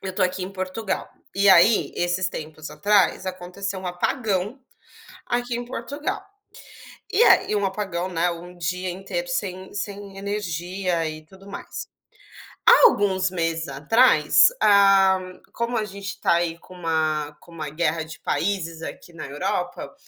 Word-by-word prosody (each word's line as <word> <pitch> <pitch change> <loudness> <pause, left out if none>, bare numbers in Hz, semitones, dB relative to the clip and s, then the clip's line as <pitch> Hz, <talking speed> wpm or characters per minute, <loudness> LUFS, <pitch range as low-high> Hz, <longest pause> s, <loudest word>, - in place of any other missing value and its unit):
Eu 190 - -4
estou 185 - +1
aqui 185 0 -2
em 190 - -8
Portugal, 190 +2 -3 0.3
e 200 0 +3
aí 190 +5 +5
esses 175 +1 0
tempos 155 -2 -8
atrás 190 +3 +2
aconteceu 185 +1 -5
um 185 - -6
apagão 205 +5 -1 0.7
aqui 240 0 -1
em 240 - -4
Portugal. 290 - -4 0.9
E 475 - +4
a - - +6
e 210 - +1
um 205 -1 +1
apagão, 190 -2 -3
né, 175 0 +1
um 175 +1 -8
dia 180 +2 -2
inteiro 195 - -4
sem 185 - -4
sem 200 -1 -6
energia 180 -3 -2
e 155 0 -9
tudo 190 +4 -17
mais. 200 - -7 0.8
Há - - +9
alguns 190 - +2
meses 165 -3 -2
atrás, 150 - +5
ah, 195 -2 +6 0.3
como 235 +1 -2
a 215 - -1
gente 200 -1 -7
tá - - +3
aí 170 -1 0
com 185 - -15
uma 155 -3 -1
com 170 - -17
uma 155 -3 -5
guerra 160 0 0
de 155 -1 -10
países 165 -5 -2
aqui 170 - -8
na 165 - -8
Europa, 140 +2 -3
185 Hz, 150 wpm, -24 LUFS, 170-200 Hz, 0.9 s, Há